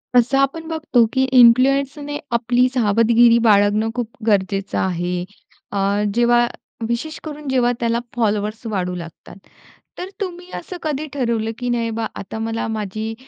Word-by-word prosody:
तसं 245 +3 +4
आपण 275 +4 0
बघतो, 315 -7 +2
की 260 -1 +2 0.2
इन्फ्लुएन्सरने 275 +4 +4 0.2
आपली 245 +2 +2
सावधगिरी 230 0 +4
बाळगणं 205 +1 +3
खूप 245 -2 -2 0.2
गरजेचं 195 -1 0
आहे. 180 -1 -1 0.5
अ, 200 +1 0
जेव्हा 240 0 +4 0.4
विशेषकरून 300 +4 -5
जेव्हा 250 -2 +2
त्याला 235 0 0 0.2
फॉलोवर्स 215 -1 -1
वाढू 180 -4 -2
लागतात. 170 -1 -10 0.6
तर 365 - -6
तुम्ही 360 -2 -5
असं 360 +1 -8
कधी 305 -1 -2
ठरवलं, 230 -5 -1
की 245 -1 -2
नाही 235 -1 0
बा 225 - -1
आता 210 +3 -7
मला 225 0 -2
माझी 220 0 -4
235 Hz, 135 wpm, -20 LUFS, 210-265 Hz, 0.6 s, तसं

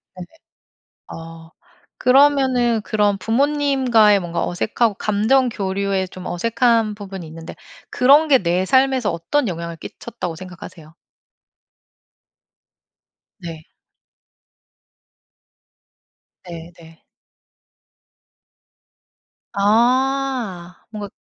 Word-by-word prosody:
네네. 180 -1 -9 0.8
아. 165 0 -11 0.5
그러면은 260 -3 +3
그런 205 -1 +1
부모님과의 255 -2 +2
뭔가 175 -2 -3
어색하고 215 +4 -1
감정 220 +6 +1
교류에 195 -2 -2
좀 185 0 -11
어색한 230 +3 +1
부분이 195 -4 -8
있는데 165 +1 -10 0.3
그런 280 +5 +4
게 275 -3 +6
내 180 0 0
삶에서 260 -2 +2
어떤 235 +11 -1
영향을 170 -2 -5
끼쳤다고 180 -1 -7
생각하세요? 175 -3 -12 2.5
네. 165 -3 -9 2.8
네 170 -1 -9
네. 165 -1 -17 2.5
아. 235 -3 0 0.2
뭔가 210 -2 -7
205 Hz, 175 characters per minute, -20 LUFS, 175-250 Hz, 2.8 s, 게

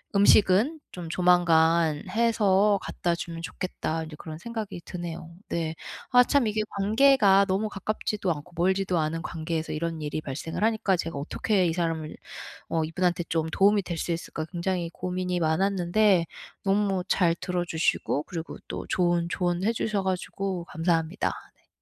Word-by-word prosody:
'음식은 205 - +5
좀 175 -2 -7
조만간 165 -3 +3
해서 210 -3 +3
갖다 175 -1 -1
주면 170 -1 -6
좋겠다.' 165 -3 -3
인제 155 -1 -9
그런 155 0 -8
생각이 220 -3 -6
드네요. 170 -2 -6 0.2
네. 160 -1 -2 0.4
아 250 0 +7
참 275 0 +2
이게 215 0 0 0.2
관계가 210 -2 +5
너무 195 +3 0
가깝지도 205 -1 -2
않고 155 +2 -6
멀지도 185 0 +1
않은 160 +1 -1
관계에서 160 0 -3
이런 165 +1 -3
일이 150 +1 -3
발생을 155 +7 -4
하니까 220 -4 +2
'제가 165 -3 -4
어떻게 185 +6 0
이 165 - 0
사람을 165 -2 -2 0.5
어 165 -1 +1
이분한테 175 +2 0
좀 160 -1 0
도움이 200 +4 +4
될 170 -2 -4
수 170 - -2
있을까?' 165 -1 -5
굉장히 175 -1 -2
고민이 180 0 -2
많았는데 185 +3 +2 0.4
너무 195 -1 +1
잘 175 -4 +3
들어 180 0 -2
주시고 160 -3 0
그리고 165 -2 -6
또 - - -5
좋은 175 -1 +1
조언해 180 +4 0
주셔 210 -3 -1
가지고 190 -1 -3
감사합니다. 165 +2 0 0.2
네. - - -35
180 Hz, 335 characters per minute, -26 LUFS, 165-195 Hz, 0.5 s, 아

